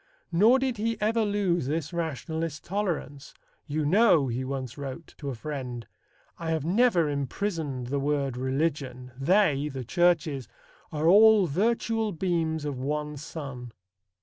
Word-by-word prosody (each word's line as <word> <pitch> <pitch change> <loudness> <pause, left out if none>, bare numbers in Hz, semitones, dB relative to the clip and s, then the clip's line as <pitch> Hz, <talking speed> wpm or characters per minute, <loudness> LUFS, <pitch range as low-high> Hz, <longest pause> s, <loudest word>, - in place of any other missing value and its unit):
Nor 215 +9 +5
did 260 -3 -1
he 225 +1 -1
ever 220 +2 +2
lose 195 -8 0
this 155 +2 -2
rationalist 160 -1 -3
tolerance. 175 -8 -3 0.3
"You 150 +1 -1
know," 175 - +4
he 120 +2 -2
once 130 -2 -4
wrote 140 +3 -7
to 140 - -4
a 130 - -4
friend, 125 -3 -5 0.5
"I 165 -1 -4
have 160 -2 -1
never 185 -3 +3
imprisoned 145 -1 -2
the 140 +3 -1
word 140 -2 0
religion.... 130 -1 -2
They" 150 0 +2
(the 135 -3 -6
churches) 160 - +1 0.4
"are 155 +1 0
all 210 +2 +7
virtual 220 +5 0
beams 160 -3 -1
of 140 -3 -3
one 150 +2 -2
sun." 135 -5 -7
155 Hz, 140 wpm, -27 LUFS, 135-185 Hz, 0.5 s, all